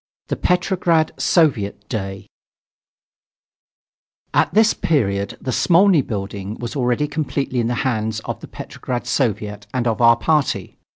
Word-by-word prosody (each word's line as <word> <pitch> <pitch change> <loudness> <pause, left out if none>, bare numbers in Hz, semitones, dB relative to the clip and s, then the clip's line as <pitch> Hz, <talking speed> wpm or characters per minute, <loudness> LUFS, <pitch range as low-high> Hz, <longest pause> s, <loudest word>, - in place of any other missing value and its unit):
THE - - 0
"PETROGRAD 175 -3 +1
SOVIET 110 - +1
DAY" 95 -3 -4 2.1
At - - +3
this 220 +1 +4
period 100 -10 0
the 130 - -3
Smolny 175 - +4
building 100 -3 -5
was 120 +2 -6
already 125 +2 +1
completely 145 -4 -2
in 115 - +1
the 120 - -1
hands 110 -3 -1
of - - -5
the - - -10
Petrograd 125 -1 -5
Soviet 105 -5 -1
and 125 -2 0
of 115 0 0
our 115 0 +6
party. 150 +2 0
120 Hz, 130 wpm, -20 LUFS, 105-155 Hz, 2.1 s, our